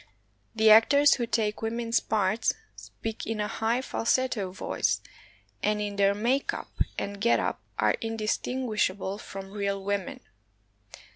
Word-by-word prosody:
The 220 0 +6
actors 280 +7 +7
who 240 -2 -1
take 215 -2 0
women's 230 +1 0
parts 210 +1 +1 0.2
speak 225 -1 -7
in 225 -1 -2
a 210 - 0
high 230 +5 -1
falsetto 230 -5 0
voice, 185 - -1 0.6
and 210 0 +1
in 205 -1 -3
their 200 0 +3
make 245 +6 0
up - - -8 0.3
and 200 0 -4
get 235 - +4
up - - -2 0.2
are - - +3
indistinguishable 215 -3 -1
from 195 -2 -8
real 200 -1 -2
women. 200 -1 -3
215 Hz, 135 wpm, -28 LUFS, 200-230 Hz, 0.6 s, actors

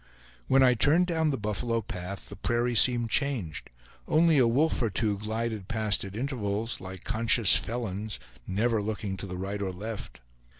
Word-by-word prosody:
When 135 0 +5
I 125 -1 +6
turned 150 +9 +4
down 160 -3 0
the 135 - -1
buffalo 110 +2 -1
path, 95 -2 -7
the 100 - -9
prairie 120 +5 0
seemed 120 -1 +3
changed; 125 - -1 0.4
only 160 -1 +4
a 125 - +5
wolf 140 +7 +2
or 115 - +1
two 105 0 -1
glided 110 -1 -3
past 110 -2 +1
at 100 0 -8
intervals, 115 -4 -2
like 95 -1 -8
conscious 115 -2 +4
felons, 110 -2 -3 0.3
never 110 +3 +1
looking 105 -2 -3
to 100 - -6
the 90 -1 -6
right 100 +2 -4
or 95 -2 -2
left. 105 +4 -7
110 Hz, 170 wpm, -28 LUFS, 100-120 Hz, 0.4 s, I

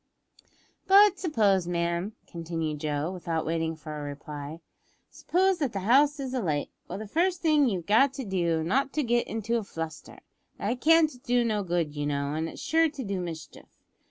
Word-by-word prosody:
"But 395 0 +6
suppose, 205 - +2
ma'am," 170 +3 -1
continued 165 -3 -4
Joe, 150 +2 -2
without 165 -3 -3
waiting 165 0 -1
for 155 -1 -8
a 150 - -5
reply; 145 +1 -7 0.5
"suppose 375 0 +1
that 275 -6 -1
the 195 - -3
house 280 +8 +4
is 265 -2 -4
alight. 160 - -1 0.2
Well, - - -5
the 215 - -6
first 345 - 0
thing 300 -5 +4
you've 180 -6 -3
got 230 +8 +4
to 270 -2 -5
do, 170 -4 0
is - - -3
not 270 +10 +1
to 305 - 0
get 240 -1 +1
into 225 +1 -1
a - - -5
fluster. 165 -4 -7 0.4
That 245 0 -2
can't 325 0 +5
do 245 0 +2
no 215 -2 0
good, 170 -5 -1
you 145 0 -2
know, 140 0 -1
and 160 +1 -2
is - - -10
sure 325 0 +2
to 285 -3 -7
do 195 -3 -3
mischief. 165 -3 -9
195 Hz, 185 wpm, -27 LUFS, 160-270 Hz, 0.5 s, But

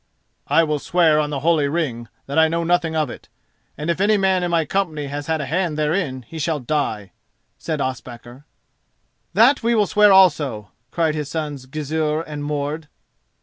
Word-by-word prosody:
"I 165 - +4
will 150 -2 -1
swear 160 -1 +3
on 150 -1 0
the 140 -2 -3
holy 155 -2 +2
ring 140 -7 -2 0.2
that 140 +3 0
I 160 - +6
know 165 +1 -1
nothing 170 -1 +1
of 155 -5 0
it, - - -12 0.5
and 150 - -5
if 170 - -3
any 210 +1 +4
man 190 -2 +2
in 175 - -1
my 165 -2 +1
company 160 -4 -2
has 145 +1 -6
had 160 -1 0
a - - -3
hand 165 +2 -1
therein 150 -4 -1
he 160 - -8
shall 155 0 -1
die," 115 -8 -2 0.5
said 155 -2 -3
Ospakar. 125 0 -6 0.9
"That 240 +7 +5
we 235 +1 +1
will 210 -2 +3
swear 210 0 +4
also," 145 - +3 0.2
cried 160 +3 0
his 150 -2 -4
sons 150 -5 -5
Gizur 155 +2 -2
and 150 -3 -7
Mord. 145 +1 -3
155 Hz, 185 wpm, -21 LUFS, 145-170 Hz, 0.9 s, I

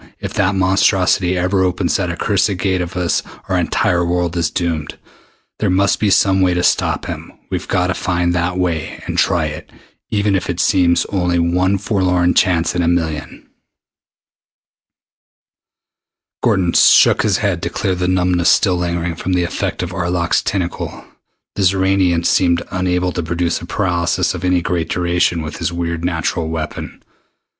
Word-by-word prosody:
If - - -6
that 95 +2 +1
monstrosity 95 -1 +2
ever 95 +2 +1
opens 90 -1 0
that 95 -3 -2
accursed 100 +2 0
Gate 95 -1 0
of 90 +1 -5
his 90 -2 0 0.3
our - - -1
entire 85 0 +1
world 85 0 -1
is 85 -3 0
doomed. 85 -4 -3 0.6
There 105 - 0
must 95 +2 +2
be 105 - +1
some 95 0 +3
way 90 -1 +2
to 90 - 0
stop - - +1
him. - - -7 0.2
We've - - -3
got 90 - +1
to 90 - 0
find 85 0 -1
that 90 +1 -1
way 85 -4 -2
and - - -4
try - - +2
it - - -7 0.4
even 105 -2 +1
if 95 - -2
it 90 0 -3
seems 90 -3 +2
only 90 -3 0
one 90 +3 +1
forlorn 90 -3 +1
chance 85 -2 +2
in 90 - 0
a 85 - 0
million." 80 -3 -2 3.0
Gordon 90 -3 +1
shook - - +5
his - - +1
head - - -1
to - - -2
clear 95 - -1
the 90 0 -2
numbness 90 -1 +2
still 95 -4 +3
lingering 85 -1 -2
from 90 +3 -3
the 90 -1 +2
effect 85 - -3
of - - -5
Arlok's 85 0 0
tentacle. 90 -3 -4 0.5
The 100 - -3
Xoranian 95 -2 +2
seemed 85 -2 +2
unable 90 0 0
to 90 - -3
produce 85 +1 -2
a 85 - -9
paralysis 90 -4 0
of - - -7
any 90 -1 +1
great 85 -2 -2
duration 85 -1 0
with 80 - -6
his 85 -1 -2
weird 85 -1 -3
natural 80 -1 -1
weapon. 80 -1 -6
90 Hz, 165 wpm, -17 LUFS, 85-95 Hz, 3.0 s, shook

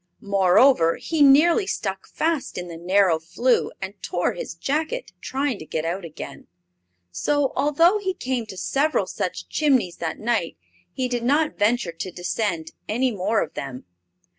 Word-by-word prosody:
Moreover, 195 -1 +4
he 320 -2 -2
nearly 320 +8 +6
stuck - - -3
fast 320 -3 -2
in 180 0 -5
the 170 - -7
narrow 180 0 +3
flue 235 +10 +1
and 190 +1 -5
tore 175 - -1
his 175 - -6
jacket 310 - -2
trying 270 -4 -2
to 155 - -8
get 160 0 -2
out 175 +3 -2
again; 155 -4 -9 0.6
so, 290 - 0
although 330 +8 +3
he 375 -2 -2
came 250 -7 -3
to 190 - -9
several 285 +10 +1
such - - -4
chimneys 260 - +1
that 160 -2 -3
night, 220 - -1 0.3
he 260 -1 -2
did 245 -1 -2
not 295 +5 +2
venture 210 -3 +2
to 165 +3 -6
descend 175 -2 -2 0.2
any 250 +4 +1
more 215 +2 +1
of - - -9
them. 130 0 -6
225 Hz, 160 wpm, -23 LUFS, 175-285 Hz, 0.6 s, nearly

